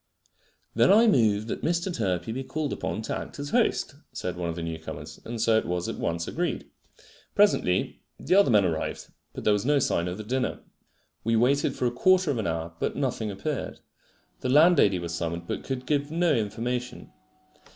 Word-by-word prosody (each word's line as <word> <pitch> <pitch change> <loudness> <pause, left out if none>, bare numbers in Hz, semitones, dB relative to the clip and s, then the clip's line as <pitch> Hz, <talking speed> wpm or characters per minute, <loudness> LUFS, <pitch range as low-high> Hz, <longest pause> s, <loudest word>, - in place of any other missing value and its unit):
"Then 115 +3 +4
I 220 +4 +7
move 110 - +3
that 115 - -4
Mr. 175 +2 -1
Turpey 95 -1 -1
be 130 +4 -3
called 150 +3 -3
upon 110 - -3
to - - -3
act - - -7
as 145 0 -5
host," - - +1 0.2
said 90 -1 -4
one 85 -1 -3
of 80 - -3
the 85 - -5
new 80 -1 -4
comers; 75 -1 -8
and 115 0 -5
so 110 0 +4
it - - -6
was 90 0 -2
at - - -5
once 85 0 -2
agreed. 175 +1 -2 0.7
Presently 150 - +2 0.2
the - - 0
other 200 -5 +6
men 105 -4 +5
arrived; 80 -3 -3 0.2
but - - -7
there 105 - +4
was 105 -1 0
no 145 +2 +3
sign 90 -9 +1
of 90 +1 -4
the 110 - -6
dinner. 125 +4 -2 0.6
We 115 +1 +1
waited 130 +5 +2
for - - -1
a 120 - +2
quarter 185 +6 +3
of 125 - -2
an 110 - -1
hour, 80 0 -3
but - - -1
nothing 125 -5 -1
appeared. 115 +9 -4 0.6
The 130 - -3
landlady 150 - +5
was 85 -1 -5
summoned, 85 0 -3
but - - -4
could 130 -1 -4
give 145 +1 0
no 170 +2 +2
information. 120 +3 -3
115 Hz, 200 wpm, -27 LUFS, 90-145 Hz, 0.7 s, I